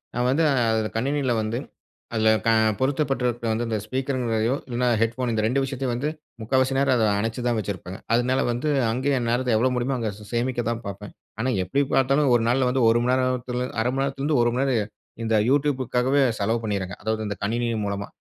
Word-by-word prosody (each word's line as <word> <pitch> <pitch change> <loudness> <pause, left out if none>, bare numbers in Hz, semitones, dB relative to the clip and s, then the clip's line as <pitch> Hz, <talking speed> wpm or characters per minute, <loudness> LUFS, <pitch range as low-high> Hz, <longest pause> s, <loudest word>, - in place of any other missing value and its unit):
நான் 120 +1 +1
வந்து 145 +5 +2 0.3
அதில 110 -1 0
கணினியில் 130 -1 0
வந்து 110 +2 -2 0.6
அதில 110 0 +3 0.2
க - - +3 0.3
பொருத்தப்பட்டு 135 -1 0
இருக்க 120 -1 -3
வந்து 115 +2 -1
இந்த 110 -1 -1
ஸ்பீக்கர்ங்கிறதையோ 125 -2 -1
இல்லைனா, 125 0 -1
ஹெட்போன் 120 +2 0
இந்த 110 -1 0
2 130 +4 +1
விஷயத்தையும் 135 -2 -2
வந்து 130 +5 -1 0.3
முக்கால்வாசி 130 +4 +1
நேரம் 135 -1 +3
அதை 110 - +3
அனைச்சு 115 +3 -2
தான் 120 -2 +1
வச்சிருப்பேங்க. 95 -3 -5
அதனால 125 +2 +2
வந்து 120 +6 -2 0.2
அங்கேயே 135 +4 0
என் 120 -1 -2
நேரத்த 125 -1 +1
எவ்வளோ 130 +3 +2
முடியுமோ 125 +2 0
அங்கே 115 -3 -2
சே 105 - -12
சேமிக்க 120 +1 0
தான் 115 0 -3
பார்ப்பேன். 100 +1 -7 0.3
ஆனா 125 +3 0
எப்டி 95 +10 0
பார்த்தாலும் 135 +1 +3
ஒரு 115 - +2
நாள்ல 125 +2 +2
வந்து 130 0 +1
1 115 +1 +3
மணி 125 - +2
நேரத்தில, 125 -1 -1 0.2
1/2 120 +2 +1
மணி 135 - +1
நேரத்திலேருந்து 140 +1 0
1 120 - +2
மணிநேரம் 125 -5 0 0.3
இந்த 110 -1 +1
யூட்யூப்க்காகவே 135 -1 +1 0.2
செலவு 110 +3 0
பண்ணிர்றேனுங்க. 100 -4 -3
அதாவது 110 0 -1
இந்த 100 - -3
கணினி 120 +3 0 0.2
மூலமா. 100 0 -3
120 Hz, 190 wpm, -24 LUFS, 110-130 Hz, 0.6 s, அதில